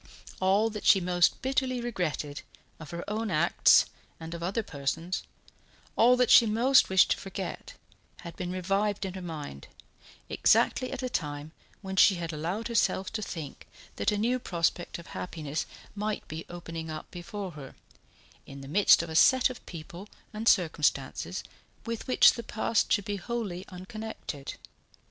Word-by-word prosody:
All 200 Hz, +4 st, +3 dB
that 210 Hz, -1 st, -6 dB
she 195 Hz, -, +6 dB
most 175 Hz, -1 st, +2 dB
bitterly 260 Hz, -1 st, 0 dB
regretted, 175 Hz, -11 st, -3 dB, 0.4 s
of 155 Hz, -, -10 dB
her 170 Hz, 0 st, -6 dB
own 215 Hz, +1 st, -2 dB
acts 170 Hz, -1 st, +5 dB, 0.3 s
and 165 Hz, +1 st, -7 dB
of 170 Hz, -, -6 dB
other 195 Hz, +6 st, -1 dB
persons', 165 Hz, +4 st, -3 dB, 0.7 s
all 245 Hz, +2 st, +5 dB
that 250 Hz, -1 st, +3 dB
she 230 Hz, -, +8 dB
most 245 Hz, +5 st, +4 dB
wished 190 Hz, 0 st, +5 dB
to -, -, +2 dB
forget, 195 Hz, -1 st, -6 dB, 0.5 s
had 170 Hz, -1 st, -9 dB
been 180 Hz, -1 st, -4 dB
revived 195 Hz, +3 st, -1 dB
in 190 Hz, -, -5 dB
her 190 Hz, -, -7 dB
mind, 150 Hz, -, -7 dB, 0.6 s
exactly 255 Hz, -, +2 dB
at 270 Hz, -1 st, -5 dB
a -, -, 0 dB
time 150 Hz, -8 st, -4 dB, 0.3 s
when 190 Hz, 0 st, -5 dB
she 195 Hz, -, +7 dB
had 170 Hz, -2 st, -4 dB
allowed 175 Hz, +9 st, -3 dB
herself 215 Hz, -4 st, 0 dB
to 220 Hz, -, -2 dB
think 160 Hz, -8 st, -7 dB, 0.3 s
that -, -, +1 dB
a 210 Hz, -, -1 dB
new 240 Hz, +4 st, +1 dB
prospect 175 Hz, -4 st, -1 dB
of 170 Hz, -, -11 dB
happiness 155 Hz, -4 st, -4 dB, 0.3 s
might 210 Hz, +1 st, -3 dB
be 160 Hz, +1 st, -7 dB
opening 165 Hz, -2 st, -7 dB
up 155 Hz, 0 st, -7 dB
before 190 Hz, +2 st, -6 dB
her, 145 Hz, -4 st, -11 dB, 0.7 s
in 140 Hz, 0 st, -9 dB
the 135 Hz, -, -9 dB
midst 180 Hz, +2 st, +5 dB
of 170 Hz, -, -7 dB
a -, -, -5 dB
set 260 Hz, +9 st, +5 dB
of 250 Hz, -, -11 dB
people 175 Hz, +4 st, -9 dB, 0.2 s
and 215 Hz, +2 st, -4 dB
circumstances 160 Hz, -2 st, +1 dB, 0.4 s
with 230 Hz, -1 st, -5 dB
which 255 Hz, -, +6 dB
the 235 Hz, -, -5 dB
past 220 Hz, 0 st, 0 dB
should 205 Hz, -3 st, +2 dB
be 205 Hz, -1 st, -2 dB
wholly 200 Hz, -4 st, -4 dB
unconnected. 185 Hz, -, -7 dB
185 Hz, 165 wpm, -29 LUFS, 165-220 Hz, 0.7 s, she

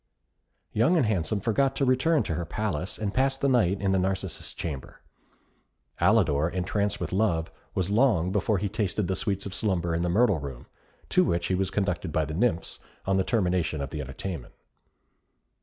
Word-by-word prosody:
Young 120 Hz, +12 st, +3 dB
and 145 Hz, -, +3 dB
Handsome 105 Hz, 0 st, 0 dB
forgot 135 Hz, +6 st, +1 dB
to 135 Hz, -, +1 dB
return 130 Hz, +5 st, +3 dB
to -, -, -2 dB
her 85 Hz, +2 st, -2 dB
palace, 90 Hz, +1 st, -3 dB
and 105 Hz, -2 st, -2 dB
passed 135 Hz, +1 st, +1 dB
the 140 Hz, -, +2 dB
night 105 Hz, -8 st, +3 dB
in 95 Hz, -1 st, +1 dB
the 95 Hz, -, +3 dB
Narcissus 95 Hz, -2 st, -2 dB
Chamber. 70 Hz, -6 st, -6 dB, 1.0 s
Alidor, 80 Hz, -8 st, +3 dB
entranced 100 Hz, +3 st, -1 dB
with -, -, -4 dB
love, 90 Hz, -5 st, +1 dB, 0.2 s
was 95 Hz, +1 st, 0 dB
long 105 Hz, -7 st, +3 dB
before 105 Hz, +1 st, +1 dB
he 100 Hz, +3 st, -1 dB
tasted 105 Hz, -2 st, -1 dB
the 95 Hz, -, 0 dB
sweets 100 Hz, -4 st, -1 dB
of 100 Hz, -, -5 dB
slumber 95 Hz, -5 st, 0 dB
in 85 Hz, -, 0 dB
the 90 Hz, -, 0 dB
Myrtle 100 Hz, -1 st, +3 dB
Room, 70 Hz, -4 st, -7 dB, 0.4 s
to -, -, +4 dB
which 85 Hz, 0 st, 0 dB
he -, -, +2 dB
was 95 Hz, 0 st, 0 dB
conducted 95 Hz, -4 st, -1 dB
by 80 Hz, +1 st, +1 dB
the 80 Hz, -, -5 dB
nymphs, 90 Hz, -2 st, 0 dB, 0.3 s
on 95 Hz, 0 st, +2 dB
the 95 Hz, -, +3 dB
termination 90 Hz, -8 st, 0 dB
of 70 Hz, -, -4 dB
the 75 Hz, -, -4 dB
entertainment. 70 Hz, +2 st, -6 dB
95 Hz, 185 wpm, -27 LUFS, 85-110 Hz, 1.0 s, to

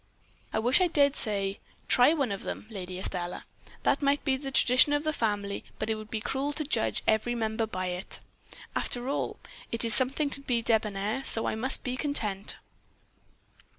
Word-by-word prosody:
"'I -, -, -2 dB
wish 245 Hz, +9 st, +4 dB
I 365 Hz, -, +4 dB
dared 285 Hz, -4 st, +3 dB
say, 200 Hz, -2 st, -1 dB, 0.3 s
try 245 Hz, +4 st, +5 dB
one 280 Hz, -8 st, 0 dB
of 200 Hz, -, -4 dB
them, -, -, -5 dB
Lady 185 Hz, -3 st, -6 dB
Estelle. 180 Hz, -1 st, -4 dB, 0.4 s
That -, -, +2 dB
may 280 Hz, 0 st, +4 dB
be 270 Hz, -2 st, 0 dB
the 270 Hz, +1 st, -5 dB
tradition 260 Hz, +2 st, +5 dB
of 290 Hz, 0 st, +1 dB
the 310 Hz, 0 st, 0 dB
family, 205 Hz, -5 st, -2 dB
but 215 Hz, +1 st, -2 dB
it -, -, +3 dB
would 215 Hz, 0 st, -8 dB
be 220 Hz, -, -2 dB
cruel 270 Hz, +6 st, -2 dB
to 305 Hz, -, -2 dB
judge 245 Hz, -6 st, 0 dB
every 220 Hz, +3 st, +2 dB
member 220 Hz, -1 st, -1 dB
by 185 Hz, -3 st, -4 dB
it. 180 Hz, +2 st, -3 dB, 0.6 s
After 245 Hz, 0 st, -2 dB
all, 280 Hz, -, -2 dB, 0.3 s
it 230 Hz, 0 st, +4 dB
is 230 Hz, -, +2 dB
something 270 Hz, +5 st, +1 dB
to 275 Hz, -, +5 dB
be 240 Hz, -4 st, -1 dB
debonair, 215 Hz, +2 st, 0 dB
so 225 Hz, -, +3 dB
I -, -, 0 dB
must 240 Hz, +5 st, -2 dB
be 250 Hz, 0 st, -2 dB
content.' 215 Hz, -10 st, 0 dB
230 Hz, 185 wpm, -28 LUFS, 210-275 Hz, 0.6 s, try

